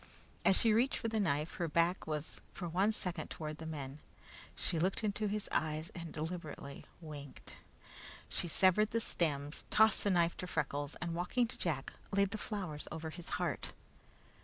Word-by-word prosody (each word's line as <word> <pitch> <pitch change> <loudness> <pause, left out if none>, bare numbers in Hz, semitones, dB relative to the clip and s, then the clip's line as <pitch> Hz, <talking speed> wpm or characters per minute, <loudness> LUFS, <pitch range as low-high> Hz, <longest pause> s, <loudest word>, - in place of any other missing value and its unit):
As 190 - +6
she 225 -2 +5
reached 240 +5 +3
for 225 - -1
the 220 0 +1
knife, 155 -5 0
her 170 - 0
back 170 +3 +2
was 155 -1 -3
for 175 - -4
one 190 +6 +3
second 180 -5 -1
toward 155 -1 -5
the 160 - -5
men. 145 -2 -5 0.6
She 165 - 0
looked 190 +6 +1
into 210 0 +1
his 210 0 -2
eyes 155 +1 0
and 170 -2 -6
deliberately 155 -3 -5
winked. 145 -4 -9 0.7
She - - -1
severed 190 +5 +5
the 230 - +1
stems, 150 -8 -1
tossed 220 0 +5
the 205 - +3
knife 170 -2 +3
to 180 - -4
Freckles, 145 -3 -1
and 170 -1 -2
walking 180 +9 +1
to - - -4
Jack, 145 -6 -2 0.2
laid 200 -1 +3
the 220 - -3
flowers 185 -10 -3
over 160 0 -4
his 175 +1 -7
heart. - - -2
170 Hz, 175 wpm, -35 LUFS, 155-200 Hz, 0.7 s, As